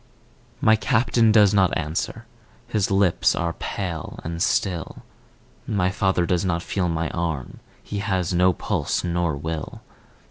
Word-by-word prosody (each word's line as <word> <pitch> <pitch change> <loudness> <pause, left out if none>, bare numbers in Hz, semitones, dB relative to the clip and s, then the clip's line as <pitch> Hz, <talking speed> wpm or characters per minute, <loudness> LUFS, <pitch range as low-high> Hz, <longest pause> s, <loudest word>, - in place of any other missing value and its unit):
My 110 -5 +5
Captain 115 0 +2
does 105 -2 +5
not 95 -3 +3
answer, 80 -1 -3 0.4
his 105 -3 0
lips 95 -3 +3
are 85 0 -1
pale 85 -5 -5
and 85 +1 -5
still, 90 -3 -1 0.6
My 95 -3 +1
father 95 -3 +1
does 90 0 0
not 85 -2 -1
feel 90 -3 -1
my 80 -1 -2
arm, 80 -7 -3 0.2
he 105 - -4
has 95 -3 -1
no 90 +1 +4
pulse - - -2
nor 85 -3 0
will. 80 +1 -5
90 Hz, 140 wpm, -23 LUFS, 85-100 Hz, 0.6 s, My